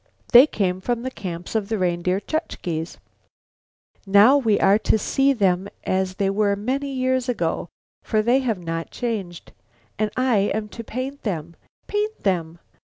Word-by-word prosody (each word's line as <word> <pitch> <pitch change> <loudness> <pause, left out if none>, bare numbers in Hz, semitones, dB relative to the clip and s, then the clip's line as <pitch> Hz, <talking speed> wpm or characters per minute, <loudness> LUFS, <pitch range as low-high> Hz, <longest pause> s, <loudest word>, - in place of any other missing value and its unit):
They 250 +4 +9
came 185 -7 -1
from 240 +3 -2
the 260 - -3
camps 175 -6 -6
of 215 -3 -1
the 220 - 0
Reindeer 180 0 0
Chukches. 180 - -4 1.1
And 195 - -11
now 215 +7 +8
we 225 -7 +2
are 200 +2 +4
to 220 - +2
see 270 +6 +2
them 195 -6 +1 0.2
as 185 0 -1
they 195 0 0
were 200 0 +1
many 265 +7 -2
years 260 -1 0
ago, 170 -7 -1 0.3
for 215 -1 0
they 245 +4 +3
have 240 -6 -1
not 165 0 -3
changed. 200 -8 -5 0.5
And 215 0 +1
I 255 -3 +2 0.2
am 215 -1 -3
to 230 - -8
paint 260 +5 -5
them! 170 -5 -4 0.3
Paint 425 +1 -2
them! 170 -4 -1
210 Hz, 165 wpm, -23 LUFS, 185-255 Hz, 1.1 s, They